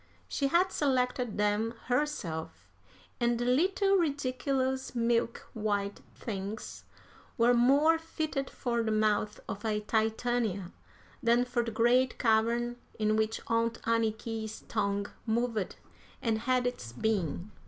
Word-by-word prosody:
She 280 - 0
had 350 +6 +3
selected 250 -5 0
them 210 +3 +1
herself, 165 - -2 0.5
and 240 0 +2
the 240 - -1
little 380 +9 +3
ridiculous 265 -4 -1
milk 235 0 0
white 205 -2 -1
things 205 0 -6 0.5
were 235 0 +5
more 280 +7 +5
fitted 315 -4 -3
for 235 -2 -1
the 225 - -1
mouth 215 -1 +1
of 200 - -5
a 215 -2 0
Titania 220 -3 0 0.5
than 240 0 +3
for 245 -1 0
the 230 - -3
great 245 +3 +3
cavern 235 +1 +2 0.2
in 215 -1 +2
which 220 0 0
Aunt 230 0 0
Anniky's 225 -1 -1
tongue 200 0 -1 0.2
moved 225 -3 0 0.4
and 225 -1 0
had 250 +2 +1
its 120 - -3
being. 195 - -1
230 Hz, 120 wpm, -30 LUFS, 215-255 Hz, 0.5 s, were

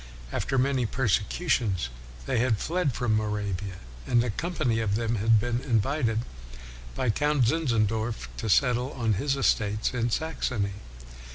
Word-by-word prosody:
After 135 - -1
many 130 -2 +2
persecutions 110 - 0 0.4
they - - 0
had 120 -2 +2
fled 165 - 0
from 120 -3 0
Moravia, 105 -3 -2 0.3
and 120 -1 +3
a 120 - -1
company 155 - -1
of 105 -3 0
them 115 +1 0
had 110 +2 +4
been 120 +2 -1
invited 115 -1 +1 0.7
by 125 -3 +1
Count 145 +1 +2
Zinzendorf 115 -5 0
to 110 - -3
settle 125 +3 +2
on 115 -4 0
his 135 +7 0
estates 110 -5 +1
in 120 -1 0
Saxony. 120 -8 -1
115 Hz, 135 wpm, -27 LUFS, 110-135 Hz, 0.7 s, had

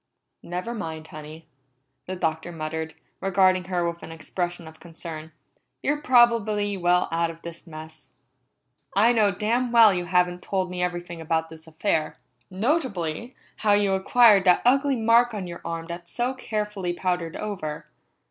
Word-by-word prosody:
"Never 180 +7 -4
mind, 160 -8 -6
Honey," 155 +1 -10 0.6
the 185 - -3
Doctor 160 -1 -2
muttered, 160 0 -5 0.2
regarding 185 -1 +3
her 175 -2 -1
with 170 0 -5
an - - -9
expression 175 +2 -4
of 160 0 -13
concern. 165 -2 -9 0.5
"You're 295 +1 0
probably 230 -6 +3
well 180 -1 +2
out 165 0 +1
of 165 0 -11
the 170 0 -8
mess. 155 -1 -11 0.9
I 225 +4 +5
know 215 -3 +4
damn 230 +6 0
well 230 -4 +7
you 180 -1 -2
haven't 180 0 +1
told 185 -2 -2
me 180 0 -3
everything 175 -1 -3
about 160 0 -1
this 160 0 -13
affair 160 -1 -1 0.3
notably, 220 - -1 0.2
how 210 -2 +3
you 205 -1 +3
acquired 205 +1 +5
that 180 -1 +4
ugly 275 +2 +4
mark 230 0 +3
on 195 -3 -4
your 170 -1 -8
arm 165 0 -4
that's 170 0 -8
so 245 +2 -1
carefully 210 -7 -3
powdered 175 -2 -2
over. 180 -8 -5
180 Hz, 155 wpm, -25 LUFS, 165-210 Hz, 0.9 s, well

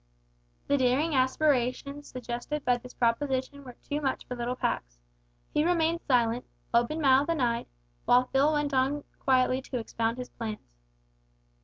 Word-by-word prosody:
The 285 - +2
daring 260 +6 +2
aspirations 275 +1 +1
suggested 250 +4 -5
by 245 0 +3
this 250 +1 -12
proposition 260 +3 0
were 250 -2 -11
too 290 +1 -2
much 270 -2 -2
for 250 - -5
little 240 +1 -2
Pax. - - -2 0.6
He 300 - +3
remained 335 0 +1
silent 240 -2 +2 0.3
open 240 +7 +2
mouthed 275 +1 +4
and 330 -2 0
eyed 235 -2 0 0.4
while 250 +1 +5
Phil 280 +3 +4
went 295 -1 0
on 270 +2 +1 0.2
quietly 255 0 +2
to 260 -1 -5
expound 230 0 -2
his 250 0 -6
plans. 215 - -7
260 Hz, 150 wpm, -28 LUFS, 245-290 Hz, 0.6 s, while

